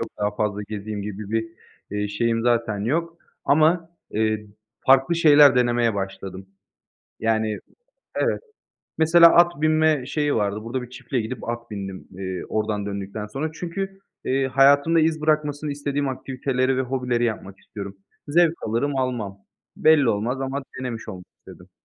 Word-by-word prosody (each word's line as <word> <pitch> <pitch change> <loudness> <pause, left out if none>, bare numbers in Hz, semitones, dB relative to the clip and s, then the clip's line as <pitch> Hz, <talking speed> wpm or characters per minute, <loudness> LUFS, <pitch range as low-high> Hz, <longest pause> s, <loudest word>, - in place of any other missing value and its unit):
yok, - - -3
daha 105 0 +1
fazla 105 -1 -1
gezeyim 105 -1 -5
gibi 105 0 -6
bir, 110 0 0 0.4
eee, 105 0 -2
şeyim 115 +2 0
zaten 115 -3 +1
yok. 165 +6 -1 0.3
Ama, 160 +3 +3 0.2
eee, 110 0 0 0.4
farklı 135 +5 +5
şeyler 150 -4 +7
denemeye 120 -2 +2
başladım. 95 -1 -5 0.7
Yani. 110 -1 0 0.6
Evet. - - +1 0.6
Mesela 165 +1 +7
at 175 -3 +4
binme 155 -4 +3
şeyi 145 0 0
vardı, 105 +1 -1
burada 125 +2 -3
bir 125 - -10
çiftliğe 130 -2 -3
gidip 115 +1 -6
at 120 -1 -5
bindim, 95 -2 -7
eee, 95 -1 -5
oradan 105 -1 -1
döndükten 100 +1 -5
sonra. 135 +8 -4
Çünkü, 195 +3 -5 0.3
eee, 135 0 +1
hayatımda 140 +5 +4
iz 160 0 +1
bırakmasını 150 -1 0
istediğim 140 0 -2
aktiviteleri 130 0 -1
ve - - +1
hobileri 125 -2 -1
yapmak 100 -4 -4
istiyorum. 100 -1 -9 0.3
Zevk 170 +2 +4
alırım 135 +6 -1
almam. 120 -7 -2 0.4
Belli 155 -5 +5
olmaz 115 +5 -1
ama 135 +1 -3 0.2
denemiş 120 -3 -5
olmak 90 -3 -8
istedim. - - -15
125 Hz, 145 wpm, -23 LUFS, 105-145 Hz, 0.7 s, şeyler